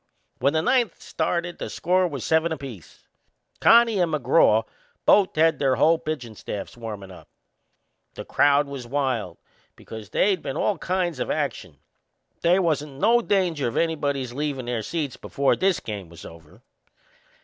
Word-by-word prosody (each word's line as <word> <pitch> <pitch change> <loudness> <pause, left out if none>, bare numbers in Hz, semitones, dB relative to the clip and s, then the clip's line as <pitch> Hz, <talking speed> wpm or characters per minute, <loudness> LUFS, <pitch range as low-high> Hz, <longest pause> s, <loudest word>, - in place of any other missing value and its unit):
When 140 +4 +2
the 160 0 +1
ninth 245 -5 +1
started 170 +2 -3
the - - -5
score 180 +1 +1
was 140 -7 -6
seven 160 +1 +2
apiece. 135 - -9 0.5
Connie 230 -3 +5
and 175 -2 +1
McGraw 140 -6 +3 0.4
both 200 -2 +4
had 160 +1 +3
their 135 -2 +2
whole 160 +6 +3
pitchin' 135 -9 -5
staffs 105 -1 -7
warmin' 105 -5 -8
up. 90 - -14 0.9
The - - -7
crowd 145 0 +3
was 135 -4 -7
wild, 125 - -2 0.4
because 110 -2 -10
they'd 195 -3 +1
been - - -5
all 200 -6 0
kinds 180 -1 -1
of - - -3
action. 115 - -3 0.6
They 175 +2 +4
wasn't 150 -6 -1
no 235 +4 +4
danger 180 - 0
of 115 - -4
anybody's 140 -6 -1
leavin' 140 -2 -3
their 120 -2 -2
seats 145 +3 -4
before 140 -1 0
this 190 -2 +1
game 100 -5 -7
was 85 0 -12
over. 80 -2 -14
145 Hz, 155 wpm, -24 LUFS, 120-170 Hz, 0.9 s, Connie